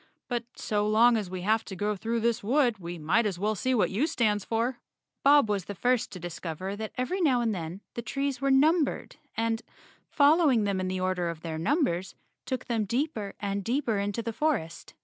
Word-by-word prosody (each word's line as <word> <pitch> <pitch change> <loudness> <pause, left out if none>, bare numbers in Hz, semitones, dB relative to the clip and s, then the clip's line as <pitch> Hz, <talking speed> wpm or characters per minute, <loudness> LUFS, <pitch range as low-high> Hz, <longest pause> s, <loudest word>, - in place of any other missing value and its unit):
But 240 -2 -2
so 210 -1 -1
long 230 +3 +5
as 210 -5 -2
we 185 0 -5
have 220 +4 +2
to 190 - -7
go 210 +3 -1
through 230 +4 -2
this 235 -1 0
wood, 240 -1 +2
we 175 0 -6
might 175 +9 +2
as 190 -4 -3
well 210 +4 0
see 255 +6 0
what 215 - +2
U 235 +11 +1
stands 210 - +1
for." 235 +4 -1 0.4
Bob 285 -3 +6
was 200 -3 -1
the 205 - -6
first 250 +3 +1
to 185 - -8
discover 175 +2 -5
that 220 +1 -5
every 355 +10 -1
now 270 -7 +3
and 230 -2 +1
then 175 +1 -5
the 235 - -4
trees 275 +3 -2
were 275 - +1
numbered 300 +3 +2 0.2
and, 225 0 0 0.5
following 290 -5 +4
them 200 -2 0
in 185 - -1
the 185 0 -2
order 185 -2 0
of 165 -2 -6
their 160 -1 -4
numbers, 195 - 0 0.3
took 260 -2 -3
them 225 -3 0
deeper 235 -3 -2
and 200 -1 -2
deeper 235 -2 0
into 205 +3 -2
the 230 0 -3
forest. 215 - -2
220 Hz, 205 wpm, -28 LUFS, 190-255 Hz, 0.5 s, Bob